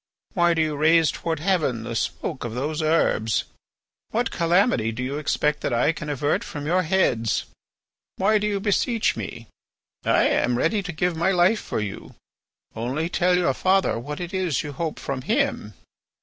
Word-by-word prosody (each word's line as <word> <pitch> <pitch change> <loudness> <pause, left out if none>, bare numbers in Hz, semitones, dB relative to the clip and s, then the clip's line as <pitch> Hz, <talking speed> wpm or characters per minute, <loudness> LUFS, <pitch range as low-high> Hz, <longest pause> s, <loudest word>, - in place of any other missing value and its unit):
Why 175 -2 +3
do 160 - +2
you 155 -1 -2
raise 160 +1 +4
towards 160 -2 -4
heaven 155 - +1
the 115 0 -5
smoke 130 - -3
of 120 -1 -5
those 150 +5 -2
herbs? 155 -8 +1 0.7
What 230 +1 -1
calamity 170 - +2
do 120 +3 -5
you 140 +3 -3
expect 150 0 0
that - - -1
I 120 +6 +3
can 150 -2 -7
avert 145 +1 0
from 145 -1 -6
your 180 +4 +2
heads? 155 - +1 0.7
Why 210 +3 +3
do 210 - -1
you 205 -1 -1
beseech 220 +3 +1
me? 115 - -6 0.6
I - - +3
am 120 0 +2
ready 200 - +1
to 185 -2 -5
give 175 +1 -1
my 170 +3 +1
life 190 +4 +3
for - - -3
you. 100 -3 -6 0.6
Only 130 +9 -2
tell 180 0 +2
your 170 -7 +2
father 190 -6 +2
what 150 +5 -6
it 175 0 -6
is 180 -8 0
you 145 - -5
hope 160 +3 -4
from 135 -2 -4
him." 225 - -1
160 Hz, 180 wpm, -24 LUFS, 130-185 Hz, 0.7 s, raise